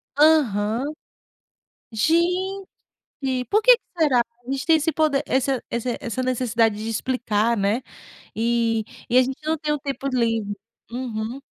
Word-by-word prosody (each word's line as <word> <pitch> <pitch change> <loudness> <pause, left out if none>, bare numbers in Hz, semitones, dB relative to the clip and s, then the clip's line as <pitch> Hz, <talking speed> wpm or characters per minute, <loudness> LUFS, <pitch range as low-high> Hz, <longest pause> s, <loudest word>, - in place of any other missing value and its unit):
Aham. 255 -7 +3 1.1
Gente, 360 - +1 0.8
por 425 +2 +3
que - - +8
que 470 - -37 0.2
será? 290 -7 +4
A 240 +1 -7
gente 270 0 -2
tem 325 -1 +6
esse 315 +1 0
poder, 305 -3 +2
essa 265 -1 0
esse 235 +1 -2
essa 245 +2 -3
necessidade 235 -4 +1
de 215 +1 -5
explicar, 230 -1 0
né. 205 +4 0 0.5
E 230 0 +1 0.3
e, 245 - +4
a - - +8
gente 260 +1 -2
não 320 +1 +1
tem 300 0 -1
o 300 - -2
tempo 275 -1 -4
livre 225 -5 0 0.3
uhum. 235 0 -4
255 Hz, 145 wpm, -23 LUFS, 225-300 Hz, 1.1 s, que